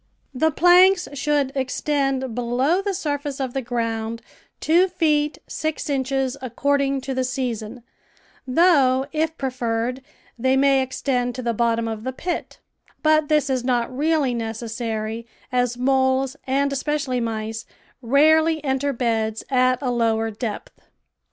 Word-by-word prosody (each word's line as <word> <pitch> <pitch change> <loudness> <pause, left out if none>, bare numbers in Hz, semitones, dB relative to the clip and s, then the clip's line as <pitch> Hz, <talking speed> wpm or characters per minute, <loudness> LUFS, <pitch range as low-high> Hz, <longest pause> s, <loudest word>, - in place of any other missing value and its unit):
The 315 +5 +2
planks 360 +3 +5
should 285 -1 0
extend 270 -1 -1
below 250 - +1
the 395 -1 -2
surface 290 -5 -3
of 260 -2 -3
the 270 - -1
ground 230 -1 -3 0.4
two 345 +4 +4
feet 305 -5 +1
six 310 -1 -3
inches 270 -1 -1
according 275 +2 0
to 265 +1 -4
the 260 0 0
season, 245 -2 -4 0.6
though, 270 -3 +4
if 320 +1 -1
pre 265 -1 -2
ferred, 240 +1 -2 0.4
they 260 +2 +2
may 275 0 +4
extend 250 -1 -1
to 255 - -5
the 235 -1 0
bottom 230 0 +1
of 220 -1 -5
the 260 +1 -3
pit; 350 +6 -4 0.5
but 310 -1 +3
this 300 -2 +3
is 260 -2 -1
not 245 0 0
really 295 -2 +1
necessary, 225 0 -4 0.2
as 245 -1 0
moles, 260 +1 +1
and 280 +2 +1
espe 285 +2 -1
cially 260 -5 -1
mice, 225 0 -4 0.3
rarely 310 +5 +3
enter 275 0 0
beds 225 -3 -1
at 255 -1 +3
a 250 - 0
lower 225 -2 +1
depth. 215 0 -6
260 Hz, 140 wpm, -22 LUFS, 235-290 Hz, 0.6 s, planks